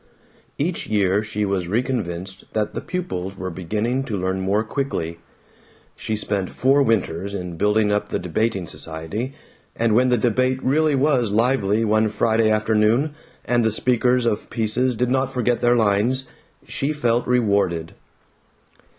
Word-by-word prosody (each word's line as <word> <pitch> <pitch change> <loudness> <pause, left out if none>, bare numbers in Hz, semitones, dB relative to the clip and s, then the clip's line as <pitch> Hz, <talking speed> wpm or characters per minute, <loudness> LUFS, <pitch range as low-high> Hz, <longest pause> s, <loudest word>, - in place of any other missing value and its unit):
Each 165 +4 -1
year 100 -2 +2
she 105 -1 -2
was 95 -3 -1
reconvinced 95 -5 -3
that 110 -1 -1
the - - -4
pupils 95 - -4
were 95 0 -4
beginning 105 +9 -2
to 105 -6 -3
learn 95 +1 -1
more 100 +3 +1
quickly. 110 - -3 0.8
She 110 - -3
spent 100 -3 -1
four 135 +2 +3
winters 100 -5 0
in 90 -3 -5
building 105 +3 +2
up 105 0 0
the - - -1
Debating 95 +2 -1
Society, 85 - -5 0.4
and 115 -1 +1
when 125 +3 +4
the 125 - +3
debate 130 +3 +1
really 150 +2 +2
was 135 -4 +2
lively 115 -1 +2
one 110 0 +2
Friday 110 +1 +2
afternoon, 110 +6 +2 0.3
and 120 -1 +2
the 110 - +3
speakers 125 +2 +2
of 105 -3 -1
pieces 120 +3 +1
did 125 +2 0
not 135 0 +1
forget 125 -2 0
their 120 0 +4
lines, 115 +4 +2 0.4
she 150 -1 -2
felt 120 -5 0
rewarded. 100 -9 +1
110 Hz, 150 wpm, -22 LUFS, 100-125 Hz, 0.8 s, when